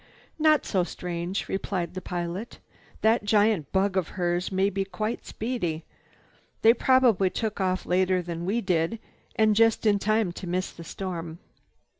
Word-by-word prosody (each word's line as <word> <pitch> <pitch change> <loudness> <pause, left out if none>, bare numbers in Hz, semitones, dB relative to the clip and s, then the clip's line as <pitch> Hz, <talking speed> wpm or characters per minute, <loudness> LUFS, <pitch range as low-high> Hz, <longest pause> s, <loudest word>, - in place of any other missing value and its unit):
"Not 310 -1 +4
so 185 -3 +1
strange," 175 +1 -4
replied 190 -3 -3
the 185 - -5
pilot. 175 +5 -5 0.4
"That 220 +1 +3
giant 205 -6 +2
bug 195 0 +1
of 185 -4 +1
hers 175 0 0
may 190 +1 +2
be 195 0 -1
quite 215 +4 -4
speedy. 180 -9 -3 0.8
They 225 +1 +8
probably 245 -6 +4
took 215 0 -3
off 185 0 0
later 185 +1 +2
than 170 -1 -5
we 215 +6 0
did 180 +1 0 0.4
and 215 -1 +3
just 225 +1 +3
in 205 -2 +4
time 215 -2 +1
to 180 +1 -8
miss 180 +2 -2
the 170 - -11
storm. 170 -3 -5
190 Hz, 155 wpm, -26 LUFS, 175-215 Hz, 0.8 s, They